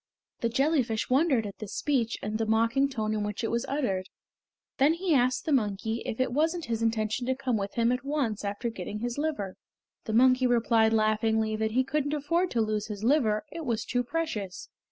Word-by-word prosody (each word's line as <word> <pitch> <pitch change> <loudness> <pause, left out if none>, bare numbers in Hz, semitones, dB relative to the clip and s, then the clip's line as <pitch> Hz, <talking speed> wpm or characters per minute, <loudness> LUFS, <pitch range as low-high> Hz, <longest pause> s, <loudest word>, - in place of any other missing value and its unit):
The 235 - 0
jellyfish 255 -3 +1
wondered 265 -4 +3
at 200 - -8
this 215 -2 -6
speech 255 -6 0
and 215 +1 -2
the 225 - 0
mocking 230 +5 +2
tone 220 -5 -2
in 210 -1 -1
which 210 +2 -4
it 225 - -1
was 235 +2 -1
uttered. 200 -10 -1 0.7
Then 285 +4 +5
he 350 -1 0
asked 255 -2 +2
the 315 - -1
monkey 220 -2 0
if 225 - -4
it 255 -2 0
wasn't 325 +4 +1
his 230 -1 -2
intention 225 +1 0
to 260 - +1
come 260 -3 -1
with 200 -1 -3
him 235 0 +2
at 250 +1 -1
once 275 -8 -1
after 205 +4 -3
getting 210 +1 -6
his 240 +3 -3
liver. 290 -12 -2 0.5
The 220 - -3
monkey 255 +2 +5
replied 230 -2 +3
laughingly 220 0 +2
that 220 0 -1
he 260 +2 +3
couldn't 290 +2 -1
afford 335 +5 0
to 235 - 0
lose 215 -1 -1
his 210 -1 -6
liver; 225 -5 +2
it 330 0 -6
was 230 -5 -1
too 245 0 0
precious. 240 - -4
235 Hz, 205 wpm, -28 LUFS, 215-270 Hz, 0.7 s, Then